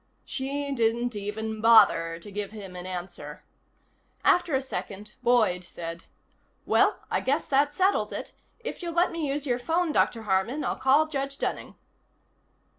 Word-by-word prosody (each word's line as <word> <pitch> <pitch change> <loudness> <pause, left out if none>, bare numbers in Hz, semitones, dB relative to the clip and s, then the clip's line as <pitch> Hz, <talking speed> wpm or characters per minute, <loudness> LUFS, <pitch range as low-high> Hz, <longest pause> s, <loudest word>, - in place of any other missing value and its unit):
She 280 +2 -3
didn't 235 -1 0
even 215 +2 -4
bother 165 -7 +5
to 185 +5 -11
give 205 0 -4
him 200 -4 -9
an 180 0 -6
answer. 175 -5 -7 0.8
After 345 -5 +3
a 265 - +1
second 210 -5 -6
Boyd 230 -7 +3
said: 170 -1 -8 0.6
"Well, - - +3
I - - +1
guess 285 +4 0
that 285 +1 +3
settles 380 +6 +1
it. - - -6 0.3
If 480 - -5
you'll 340 -1 -4
let 345 +1 +3
me 330 -3 -2
use 285 +1 -2
your 245 -3 0
phone, 330 +6 0
Dr. 230 -6 +1
Harman, 215 +9 0
I'll - - -1
call 275 +4 +4
Judge 275 -2 -4
Dunning." - - -3
240 Hz, 155 wpm, -27 LUFS, 200-285 Hz, 0.8 s, bother